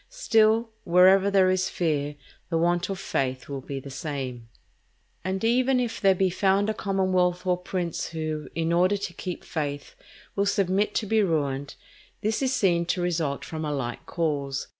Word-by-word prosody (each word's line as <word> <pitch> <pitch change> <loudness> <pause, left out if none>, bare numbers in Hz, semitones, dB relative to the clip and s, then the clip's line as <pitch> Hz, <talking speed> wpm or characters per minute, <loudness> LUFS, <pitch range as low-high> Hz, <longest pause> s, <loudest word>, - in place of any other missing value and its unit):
Still, 225 - +2
wherever 185 +3 +5
there 190 -2 +4
is 185 0 +1
fear, 150 -4 -1 0.3
the 165 - +1
want 175 +2 +1
of 195 - -3
faith 130 -8 -2
will 140 -1 -5
be 135 +1 -5
the 135 +1 -10
same. 130 -4 -5 0.7
And 190 +2 -2
even 250 +3 +3
if 240 -2 -2
there 195 -1 +5
be 185 0 +1
found 195 +3 +2
a - - -2
commonwealth 185 -3 0
or 180 -1 +3
prince 180 -2 -3
who, 155 -2 -4
in 165 0 0
order 185 +4 +3
to 195 -3 -5
keep 180 +1 -6
faith, 145 -3 -4 0.4
will 200 0 +1
submit 195 +1 +1
to 220 - 0
be 220 +1 +2
ruined, 145 -6 -1 0.5
this 215 +4 0
is 260 -1 +1
seen 175 -9 +2
to 180 - 0
result 165 -5 -1
from 160 -1 -5
a 150 - -2
like 120 -4 -4
cause. 145 -5 -2
180 Hz, 175 wpm, -26 LUFS, 150-195 Hz, 0.7 s, wherever